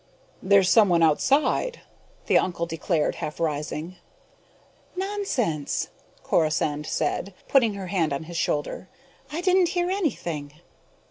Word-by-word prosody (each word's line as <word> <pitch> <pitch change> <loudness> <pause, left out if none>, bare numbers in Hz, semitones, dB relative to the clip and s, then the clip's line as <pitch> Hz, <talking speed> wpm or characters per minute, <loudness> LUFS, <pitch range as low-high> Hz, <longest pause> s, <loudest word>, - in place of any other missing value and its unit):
"There's 195 -1 +4
someone 185 -6 +5
outside!" 280 - +2 0.4
the - - +2
uncle 170 -2 -1
declared, 165 -1 -1
half 150 - -5
rising. 155 +2 -3 1.0
"Nonsense!" 365 - -2 0.3
Corisande 150 -2 0
said, 180 +5 -2
putting 235 -7 +3
her 195 -1 -5
hand 175 -4 0
on 140 +3 -2
his 170 +2 -9
shoulder. 150 +3 -2 0.4
"I 320 +3 -3
didn't 365 -1 +3
hear 350 +1 +1
anything." 170 - -2
180 Hz, 115 wpm, -25 LUFS, -, 1.0 s, someone